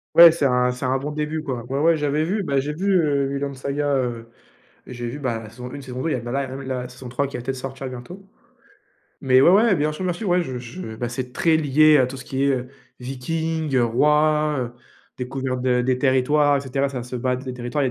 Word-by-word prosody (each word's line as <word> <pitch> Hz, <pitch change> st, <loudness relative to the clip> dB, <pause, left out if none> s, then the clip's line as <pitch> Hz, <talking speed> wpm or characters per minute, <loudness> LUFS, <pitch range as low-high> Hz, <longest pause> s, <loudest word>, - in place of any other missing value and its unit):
Ouais, 170 Hz, 0 st, +11 dB
c'est 160 Hz, -3 st, -1 dB
un 125 Hz, -1 st, +3 dB
c'est 125 Hz, +1 st, -5 dB
un 130 Hz, +1 st, +1 dB
bon 145 Hz, +3 st, -4 dB
début 150 Hz, +1 st, -3 dB
quoi. 125 Hz, -6 st, -4 dB
Ouais, 135 Hz, +3 st, -3 dB
ouais, 165 Hz, +1 st, +4 dB
j'avais 150 Hz, +1 st, 0 dB
vu, 200 Hz, +6 st, -1 dB
bah 140 Hz, -7 st, 0 dB
j'ai 145 Hz, +2 st, -3 dB
vu, 190 Hz, +6 st, -2 dB
heu, 145 Hz, -4 st, +2 dB
Vinland 140 Hz, 0 st, -3 dB
Saga, 140 Hz, +2 st, -1 dB
heu, 120 Hz, -2 st, -3 dB, 0.6 s
j'ai 120 Hz, -1 st, -6 dB
vu 120 Hz, +5 st, -5 dB
ben 115 Hz, -6 st, -3 dB
saison 125 Hz, +2 st, -9 dB
une, 145 Hz, -, -7 dB
saison 130 Hz, -1 st, -6 dB
deux, 165 Hz, -, 0 dB
y -, -, +1 dB
là 125 Hz, -, -1 dB
bah 120 Hz, +1 st, -6 dB
là 140 Hz, +2 st, 0 dB, 0.2 s
il 135 Hz, -, -8 dB
y 130 Hz, -, -3 dB
a 125 Hz, -1 st, -2 dB
la -, -, -6 dB
saison 125 Hz, 0 st, -10 dB
trois 130 Hz, +3 st, -1 dB
qui 140 Hz, -, -7 dB
va 125 Hz, -, -4 dB
peut-être 130 Hz, +2 st, -3 dB
sortir 135 Hz, +1 st, -6 dB
bientôt, 130 Hz, +11 st, -9 dB, 1.0 s
mais 130 Hz, -1 st, +5 dB
ouais, 155 Hz, -, +7 dB
ouais, 205 Hz, +1 st, +5 dB
bien 150 Hz, -1 st, 0 dB
sûr 155 Hz, +5 st, -6 dB
bien 180 Hz, -1 st, 0 dB
sûr, 200 Hz, +5 st, -5 dB
ouais 180 Hz, 0 st, +3 dB
je 130 Hz, -7 st, -4 dB
je 120 Hz, 0 st, -8 dB
ben 120 Hz, +2 st, -3 dB
c'est 125 Hz, +1 st, -5 dB
très 165 Hz, +3 st, +3 dB
lié 155 Hz, 0 st, +5 dB
à 125 Hz, -, +3 dB
tout 135 Hz, +1 st, -7 dB
ce 130 Hz, -, -10 dB
qui 135 Hz, +1 st, -1 dB
est, -, -, +3 dB
heu, 125 Hz, -2 st, 0 dB, 0.3 s
viking, 155 Hz, +4 st, -3 dB
heu, 120 Hz, -2 st, +4 dB
roi, 150 Hz, +4 st, +2 dB
heu, 120 Hz, -1 st, -3 dB, 0.5 s
découverte 130 Hz, 0 st, -3 dB
des 125 Hz, 0 st, +1 dB
territoires 145 Hz, +2 st, +3 dB
et 140 Hz, -, -3 dB
cetera, 135 Hz, +1 st, -1 dB
ça 130 Hz, -3 st, -5 dB
se 125 Hz, +1 st, -7 dB
battre 125 Hz, +1 st, -2 dB
des 130 Hz, -, -4 dB
territoires, 125 Hz, +4 st, -2 dB
il 130 Hz, -, +1 dB
135 Hz, 255 wpm, -22 LUFS, 125-150 Hz, 1.0 s, Ouais